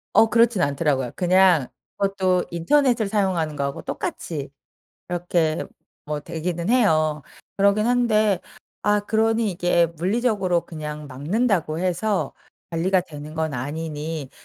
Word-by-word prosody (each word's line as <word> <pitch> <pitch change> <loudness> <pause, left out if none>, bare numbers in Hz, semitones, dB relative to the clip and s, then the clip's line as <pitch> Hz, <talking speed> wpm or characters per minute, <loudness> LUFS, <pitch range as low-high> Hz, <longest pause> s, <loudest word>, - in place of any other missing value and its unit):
어 225 - +7
그렇진 230 -3 +3
않더라고요. 140 -4 0
그냥 180 -5 +4 0.3
그것도 190 -2 +1
인터넷을 230 - +2
사용하는 190 -7 0
거하고 140 -1 -3
똑같이 145 -4 -5 0.6
이렇게 175 -2 0 0.4
뭐 150 0 -3
되기는 170 +3 -4
해요. 155 - +3 0.3
그러긴 200 +2 +3
한데 215 -5 +2 0.4
아 210 +1 +3
그러니 220 +1 +1
이게 175 -1 +2
물리적으로 185 +1 0
그냥 150 -2 -7
막는다고 165 - 0
해서 185 +3 0 0.4
관리가 180 +3 +2
되는 150 -3 -9
건 160 -2 -2
아니니 150 +2 -4
175 Hz, 290 characters per minute, -23 LUFS, 155-205 Hz, 0.6 s, 어